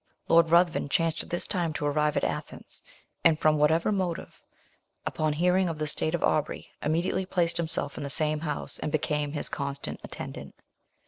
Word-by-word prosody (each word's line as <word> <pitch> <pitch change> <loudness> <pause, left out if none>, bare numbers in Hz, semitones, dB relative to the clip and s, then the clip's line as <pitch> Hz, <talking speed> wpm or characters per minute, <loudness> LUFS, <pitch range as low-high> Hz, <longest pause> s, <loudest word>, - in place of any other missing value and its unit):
Lord 165 -1 +5
Ruthven, 170 -3 +3
chanced 165 +2 +1
at - - -9
this 175 - -2
time 170 -4 -1
to 150 - -3
arrive 150 +1 +1
at - - 0
Athens, - - -5 0.4
and, 160 -2 +4
from 155 -1 +3
whatever 160 +6 +3
motive, 185 -4 -3 0.6
upon 155 -1 0
hearing 180 +3 +2
of 165 - -4
the 155 - -2
state 155 +2 0
of 170 - -3
Aubrey, 150 - 0
immediately 170 +4 0
placed 170 -2 +1
himself 160 -4 0
in - - -4
the 140 - -4
same 155 +1 +2
house, 155 -1 -1
and 150 - -3
became 150 -1 -1
his 150 - +1
constant 140 -1 -4
attendant. - - -8
155 Hz, 180 wpm, -28 LUFS, 150-170 Hz, 0.6 s, Lord